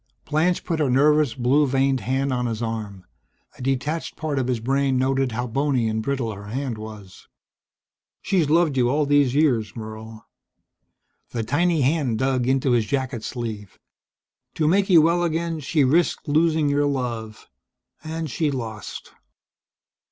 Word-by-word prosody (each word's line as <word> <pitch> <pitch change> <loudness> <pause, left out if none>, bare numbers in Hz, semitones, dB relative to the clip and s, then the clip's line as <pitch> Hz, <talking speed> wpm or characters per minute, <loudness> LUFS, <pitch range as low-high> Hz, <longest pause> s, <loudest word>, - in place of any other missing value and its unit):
Blanche 160 +4 +1
put 165 -2 -1
her 145 -3 +1
nervous, 145 0 +3
blue 135 +4 +2
veined 135 0 +1
hand 135 +2 -1
on 125 -1 -1
his 115 -2 -3
arm. 110 -5 -5 0.5
A - - -9
detached 135 +5 -2
part 150 -3 -2
of 125 - -1
his 125 -2 0
brain 135 +2 +1
noted 135 -1 +1
how 125 +2 -2
bony 130 -1 0
and 110 0 -1
brittle 125 -1 -2
her 100 +1 -10
hand 125 0 -4
was. 105 -4 -11 1.0
"She's 175 -7 +1
loved 160 -3 +3
you 120 -1 +3
all 145 +3 +1
these 140 -2 +3
years, 125 -9 +1
Merle." 110 0 -9 1.0
The 115 -2 -3
tiny 160 +6 +1
hand 135 -4 +1
dug 130 -1 0
into 135 0 +2
his 115 -3 +2
jacket 130 -4 -2
sleeve. 110 -5 -6 0.8
"To 155 - +1
make 195 +4 +2
you 165 -4 +7
well 170 +2 +2
again 165 -1 -1
she 150 +1 +1
risked 160 +5 +1
losing 155 0 +2
your 145 0 +2
love 120 -5 -4 0.6
and 160 0 -4
she 155 +2 -1
lost." 110 -7 -6
135 Hz, 155 wpm, -23 LUFS, 115-150 Hz, 1.0 s, you